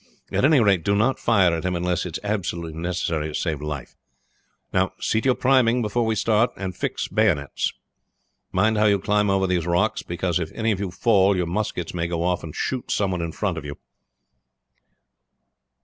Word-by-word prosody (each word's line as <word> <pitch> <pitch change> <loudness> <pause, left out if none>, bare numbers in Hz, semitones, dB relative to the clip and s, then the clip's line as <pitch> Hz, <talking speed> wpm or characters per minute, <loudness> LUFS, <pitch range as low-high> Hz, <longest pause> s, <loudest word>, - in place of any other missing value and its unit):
At - - 0
any 145 0 +5
rate, 100 -7 +3
do 100 - +2
not 120 +6 +2
fire 95 -7 +3
at 80 - -4
him 90 0 -1
unless 90 +1 -1
it 85 - -4
is - - -15
absolutely 85 -6 -3
necessary 85 -3 -1
to 75 - -6
save 80 -4 -2
life. 75 -3 -6 0.8
Now 95 0 +1
see 110 - 0
to - - -1
your 130 - +4
priming 125 -2 +3
before 115 +2 0
we 110 - +1
start, 110 +2 +2
and 95 -2 -4
fix - - -3
bayonets. 90 -11 +1 0.8
Mind 105 +3 +2
how 110 - +4
you 100 -1 +4
climb 105 +1 +1
over 95 0 +2
these 90 -2 0
rocks, 90 +6 +1
because 85 0 -2
if 80 -2 -4
any 115 -1 0
of 100 - -1
you 100 -2 -2
fall 100 +1 +3
your 90 - 0
muskets 90 -1 -3
may 85 -1 -1
go 85 -1 -2
off 90 0 0
and 80 -2 -8
shoot 130 -2 -3
some 100 -2 0
one 90 -2 -2
in 85 -1 -3
front 90 -2 -2
of - - -11
you. 75 0 -6
95 Hz, 200 wpm, -23 LUFS, 85-110 Hz, 0.8 s, any